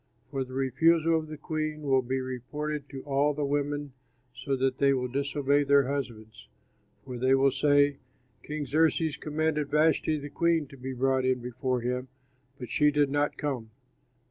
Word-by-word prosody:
For 135 -2 -1
the 130 0 -10
refusal 160 +5 +3
of 160 -1 -1
the 155 0 -8
queen 155 0 -3
will 135 -2 +3
be 130 +1 -2
reported 145 +3 -5
to 135 -2 -8
all 145 +1 +1
the 145 0 -1
women 145 0 -2 0.4
so 140 -2 -2
that 130 0 0
they 140 -1 +4
will 125 -1 -1
disobey 140 +2 +1
their 140 -1 +4
husbands, 120 - -5 0.6
for 125 -2 -6
they 130 +2 +4
will 135 0 +4
say, 145 0 +3 0.4
'King 150 -1 -4
Xerxes 160 +1 +2
commanded 150 -1 -1
Vashti, 155 0 +2
the 145 -1 -7
queen, 170 -2 +1
to 140 - -12
be 130 0 -6
brought 130 +1 +1
in 130 0 +1
before 125 +1 -2
him, 125 +2 -2 0.5
but 125 -4 -8
she 150 0 +4
did 145 -1 +2
not 145 0 0
come!' 130 -7 -3
140 Hz, 170 wpm, -28 LUFS, 130-150 Hz, 0.6 s, they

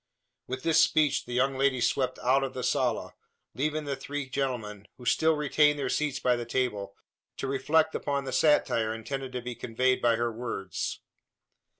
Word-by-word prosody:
With 130 +1 -5
this 165 0 +4
speech, 155 -3 +2
the 125 - -5
young 130 +2 +1
lady 135 -2 +2
swept 130 +2 0
out 135 +2 +3
of 135 -1 -4
the 125 - -4
sala, - - 0 0.4
leaving 155 +3 -1
the 140 -1 -2
three 145 0 -5
gentlemen, 120 -7 -3
who 125 - -12
still 160 +6 +3
retained 150 0 +3
their 135 -3 -2
seats 145 -3 0
by 125 -2 +2
the 120 - -3
table, 115 -5 -2 0.4
to - - -3
reflect 150 +4 +2
upon 140 -1 -1
the 130 -1 -5
satire 115 -7 +2
intended 135 +4 -5
to 125 -1 -4
be 125 0 -4
conveyed 130 +3 0
by 120 -1 +4
her 120 0 -1
words. 110 -5 -4
130 Hz, 180 wpm, -28 LUFS, 120-140 Hz, 0.4 s, this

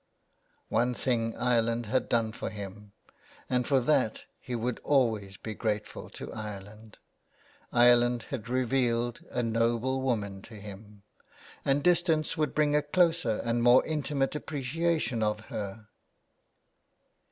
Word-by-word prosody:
One 125 +1 +1
thing 115 -3 0
Ireland 120 -1 +1
had 130 +5 0
done 115 -2 +1
for - - -5
him, 105 0 -9 0.6
and 125 -1 0
for 135 -2 +4
that 125 -4 +1 0.2
he 125 - -5
would 120 +1 -2
be - - -16
always 110 -8 +1
grateful 105 -1 -4
to - - -8
Ireland 105 0 -8 0.4
— - - -30
Ireland 120 0 +5
had 120 -4 -5
revealed 120 -2 +1
a 125 - -1
noble 115 +3 +1
woman 105 -7 -1
to 115 - -13
him; 105 0 -11 0.6
and 140 +1 +1
distance 170 -3 +2
would 155 -3 -1
bring 150 -1 +3
a 150 - +4
closer 160 -7 +2
and 115 0 0
more 120 +2 +6
intimate 145 -3 -1
appreciation 150 -2 -1
of 105 0 +1
her. 105 +1 -5
120 Hz, 130 wpm, -29 LUFS, 110-135 Hz, 0.6 s, more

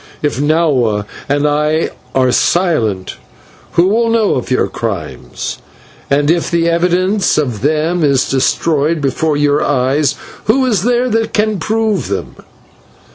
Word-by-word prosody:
If 145 -4 -1
Nahua 140 -9 +1 0.2
and 145 +1 +1
I 150 +2 0 0.2
are 130 -1 +3
silent, 120 - 0 0.6
who 170 +1 +4
will 230 +3 +2
know 225 -2 +2
of 125 - -3
your 130 - +1
crimes? 85 - -5 0.5
And 145 +2 +2
if 170 0 0
the 170 -1 +1
evidence 180 +4 +1
of 125 -9 -1
them 155 +4 0
is 140 -3 +2
destroyed 150 +4 +1
before 145 +2 0
your 145 0 +2
eyes, 140 +2 +1 0.3
who 260 +5 +2
is 220 -8 +1
there 245 +3 +1
that 225 0 -1
can 210 -2 +1
prove 215 +3 -1
them? 100 0 -4
155 Hz, 135 wpm, -15 LUFS, 135-185 Hz, 0.6 s, who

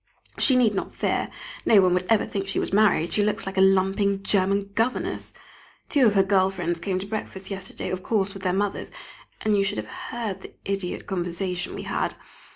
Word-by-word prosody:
She 265 - +4
need 235 -4 +4
not 195 - -4
fear, - - 0 0.3
no 215 - +6
one 185 -2 +4
would 180 0 0
ever 225 -2 +4
think 195 -1 -3
she 195 - -2
was - - -1
married, 200 -5 +3
she 210 - +3
looks 210 0 -1
like 195 0 -5
a 190 - +3
lumping 195 +1 +3
German 200 0 +1
governess. 230 +4 -1 0.6
Two 275 -5 +5
of 205 - +2
her 195 - +6
girl 190 -1 +3
friends 175 -3 -2
came 190 +1 -1
to 185 - -4
breakfast 200 -2 -5
yesterday, 190 -1 -5
of 185 0 -3
course 200 -2 0
with 195 - -9
their 185 -1 +1
mothers, 200 +2 -1 0.5
and 215 -1 +2
you 200 - +3
should 195 +1 -1
have - - -4 0.2
heard 220 -5 -4
the - - -11
idiot 195 -2 -3
conversation 180 -1 -3
we - - -5
had! - - -1
195 Hz, 205 wpm, -25 LUFS, 190-205 Hz, 0.6 s, no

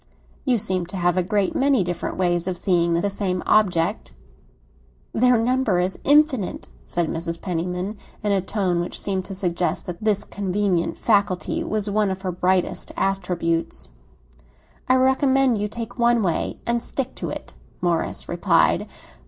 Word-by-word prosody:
"You 255 -3 +3
seem 185 -5 0
to 190 - -6
have 175 -1 +2
a 185 - +2
great 200 +1 0
many 270 -6 +3
different 175 -1 -4
ways 175 -1 +1
of 185 -1 -2
seeing 170 -2 +2
the 170 +4 +1
same 185 -2 -2
object." 190 -2 +1 1.0
"Their 250 +1 +4
number 235 -4 +1
is 180 +1 -1
infinite!" 290 - +2 0.2
said 175 -2 0
Mrs. 165 +1 -3
Penniman, 180 +3 -3 0.2
in 210 - +1
a 195 -1 +2
tone 190 -3 0
which 175 - -2
seemed 190 -2 -2
to 195 - -7
suggest 180 -2 -1
that 175 +2 -7
this 210 -2 +2
convenient 195 -3 -1
faculty 200 -4 +1
was 215 -1 -1
one 210 0 +1
of 190 +1 -4
her 185 - -1
brightest 180 +1 0
attributes. 170 - -1 1.0
"I 255 - +6
recommend 265 -2 +3
you 210 - -1
to - - -16
take 235 +1 -6
one 235 -1 +3
way 175 -4 -1
and 235 0 0
stick 265 +1 -4
to - - -4
it," - - -7 0.3
Morris 175 -2 -1
replied. - - +2
190 Hz, 160 wpm, -23 LUFS, 175-215 Hz, 1.0 s, I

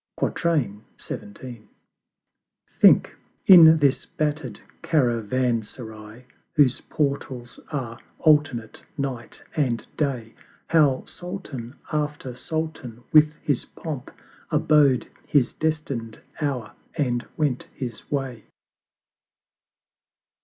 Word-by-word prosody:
XVII. 115 - -3 1.2
Think, - - +6 0.3
in 165 -4 +10
this 140 -3 +2
batter'd 150 -7 -2 0.2
Caravanserai 120 -5 -1 0.3
Whose 140 -4 +4
Portals 135 -4 -2
are 125 -6 -4 0.2
alternate 145 -8 +2
Night 135 -4 -5
and 125 -7 0
Day, 125 -7 -2 0.4
How 150 -5 +3
Sultan 150 -9 -7 0.2
after 150 -4 -2
Sultan 145 -5 -5
with 155 0 +6
his 140 -4 0
Pomp 150 -6 -7 0.4
Abode 145 -5 +4 0.2
his 135 -5 +2
destined 145 -8 -3 0.2
Hour, 130 -7 -2 0.3
and 125 -5 0
went 145 -5 0
his 120 -5 -6
way. 135 -5 -3
135 Hz, 80 wpm, -24 LUFS, 120-150 Hz, 1.2 s, in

